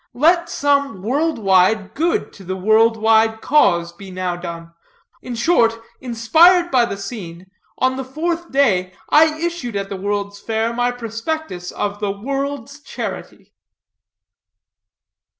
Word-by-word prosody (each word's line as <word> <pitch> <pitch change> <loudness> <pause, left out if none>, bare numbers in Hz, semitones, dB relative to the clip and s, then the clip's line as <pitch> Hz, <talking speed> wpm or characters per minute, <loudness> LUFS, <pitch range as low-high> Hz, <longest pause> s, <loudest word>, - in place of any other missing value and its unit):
Let 340 +6 +3
some 280 - 0
world 295 +8 0
wide 195 0 +2
good 330 +7 -1
to 195 - -13
the 185 +1 -4
world 220 +4 +3
wide 220 0 +3
cause 170 - +2
be 195 +2 -12
now 185 -1 -3
done. 170 -1 -8 0.5
In 245 - -6
short, 230 -3 +2 0.2
inspired 320 +9 +4
by 245 -2 +4
the 200 - -5
scene, 190 -4 -8 0.3
on 260 0 +1
the 265 - -3
fourth 330 +6 -3
day 190 -10 +2 0.2
I 310 0 +5
issued 335 -9 -3
at 195 0 -3
the 200 - -4
World's 205 +1 -3
Fair 225 +1 -2
my 245 +1 +1
prospectus 230 - -5
of 205 0 -3
the 205 -1 -2
World's 275 +5 -4
Charity." 290 - -7
230 Hz, 135 wpm, -19 LUFS, 200-280 Hz, 0.5 s, I